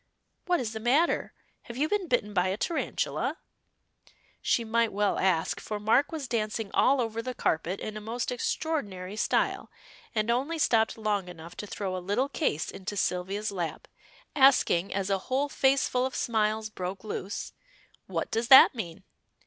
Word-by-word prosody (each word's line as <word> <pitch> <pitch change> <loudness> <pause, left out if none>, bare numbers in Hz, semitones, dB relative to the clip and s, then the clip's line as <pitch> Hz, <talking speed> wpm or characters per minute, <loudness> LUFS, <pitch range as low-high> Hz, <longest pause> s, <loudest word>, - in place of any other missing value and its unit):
What 355 -1 +2
is 225 -3 -3
the 220 - -4
matter? 265 +9 +2 0.3
Have 235 - -8
you 295 +3 +1
been 400 0 -1
bitten 220 -6 0
by 180 -1 +2
a 190 +2 -1
tarantula?" 335 +8 -2 1.0
She 235 - +1
might 230 0 +1
well 205 +1 0
ask, 180 -4 +1
for 210 -1 -5
Mark 225 +7 +3
was 310 -5 -4
dancing 215 -2 -2
all 270 +1 +4
over 230 -1 -1
the 255 +1 -5
carpet 170 +4 -1
in 215 - -5
a 215 - -6
most 230 +3 -3
extraordinary 210 - -3
style, - - 0 0.5
and 215 +1 +1
only 275 +7 0
stopped 225 -8 +2
long 210 -4 -1
enough 170 0 -10
to 210 - -6
throw 195 -2 -4
a - - -2
little 205 +10 0
case 175 - -1
into 195 +2 -6
Sylvia's 195 +4 -1
lap, 175 -4 -4 0.5
asking 260 - +4
as 195 0 -2
a 195 - +2
whole 275 +3 +1
faceful 265 -2 +2
of 260 - -9
smiles 215 -1 0
broke 185 0 -5
loose 205 -2 -5 0.5
"What - - -3
does 225 +1 0
that 265 +1 +9
mean?" 185 -7 -6
220 Hz, 165 wpm, -28 LUFS, 195-255 Hz, 1.0 s, that